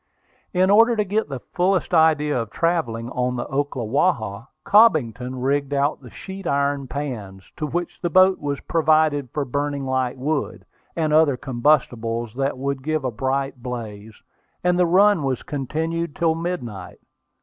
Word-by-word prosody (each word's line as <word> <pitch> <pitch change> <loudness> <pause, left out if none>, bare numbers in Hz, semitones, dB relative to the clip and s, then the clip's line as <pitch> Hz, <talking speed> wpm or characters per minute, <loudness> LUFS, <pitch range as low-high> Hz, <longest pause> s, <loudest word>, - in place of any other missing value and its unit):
In 185 +1 +3
order 230 +3 +6
to 210 - +1
get 205 -3 -1
the 135 -2 -5
fullest 185 +1 +1
idea 150 -5 +3
of 115 - -6
travelling 120 -8 -1
on 125 0 -1
the 120 - -3
Ocklawaha, 130 - -1 0.2
Cobbington 130 - +3
rigged 140 +1 0
out 140 +1 0
the 125 - -12
sheet 190 - -8
iron 140 -1 0
pans, 110 -9 -6
with 150 -2 -2
which 175 0 -4
the 175 - -1
boat 185 +2 +5
was 145 -1 -3
provided 155 -4 +2
for 145 +3 -3
burning 140 +1 -2
light 130 -1 -1
wood, 145 +2 -3 0.3
and 155 -2 0
other 155 -4 +4
combustibles 120 -4 0
that 135 +1 -2
would 140 0 -3
give 155 0 -2
a 130 - 0
bright 135 +2 -2
blaze, 110 -4 -7 0.4
and 180 0 +2
the 180 - +4
run 195 +1 +4
was 135 -2 -2
continued 160 +3 -3
till 165 -1 +2
midnight. 140 - -5
140 Hz, 155 wpm, -22 LUFS, 125-165 Hz, 0.4 s, order